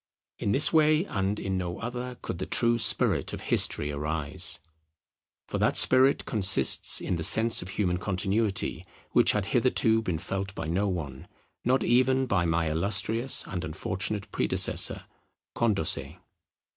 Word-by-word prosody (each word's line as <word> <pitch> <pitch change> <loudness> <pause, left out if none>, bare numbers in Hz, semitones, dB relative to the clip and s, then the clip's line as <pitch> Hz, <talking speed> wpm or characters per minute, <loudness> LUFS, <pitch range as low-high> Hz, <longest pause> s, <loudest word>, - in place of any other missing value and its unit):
In 100 - -2
this 140 +9 +3
way 155 +2 +3
and 100 - -3
in 95 -1 -3
no 90 -1 -5
other 125 +1 -6
could 85 - -6
the 95 - -5
true 115 0 +1
spirit - - +2
of - - -6
history 75 - +1
arise. 75 0 -2 0.9
For - - -4
that - - +1
spirit 130 +2 +3
consists 95 -4 +3
in 90 - -3
the 80 - -4
sense 110 +7 +5
of 90 - -9
human 90 -3 -2
continuity, 95 +2 -2 0.3
which - - +4
had - - -2
hitherto 110 0 +2
been 90 -7 -3
felt 95 +4 -6
by 80 - -6
no 95 +5 -1
one, 75 -8 -6 0.4
not 130 +2 +1
even 130 +2 +2
by 95 -8 -1
my 80 -1 -1
illustrious 100 +8 +1
and 90 -3 -6
unfortunate 100 +6 -5
predecessor - - +1 0.5
Condorcet. 80 - +1
100 Hz, 145 wpm, -26 LUFS, 85-115 Hz, 0.9 s, sense